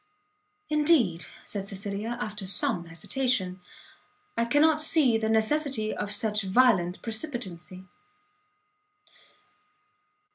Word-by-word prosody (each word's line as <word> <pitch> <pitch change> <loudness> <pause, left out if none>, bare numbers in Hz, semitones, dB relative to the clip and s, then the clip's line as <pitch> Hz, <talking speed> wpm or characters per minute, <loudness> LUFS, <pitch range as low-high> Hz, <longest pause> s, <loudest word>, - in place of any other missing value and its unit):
"Indeed," 295 - +2 0.2
said 200 -2 -5
Cecilia, 200 +4 -4
after 210 -3 -4
some 180 -2 +1
hesitation, 185 - -2 0.7
"I 230 - +1
cannot 300 +5 +3
see 305 -6 +4
the 220 0 -1
necessity 225 0 +1
of 205 - -4
such 210 +1 0
violent 190 -4 +2
precipitancy." 220 - -5
220 Hz, 85 wpm, -27 LUFS, 190-255 Hz, 0.7 s, see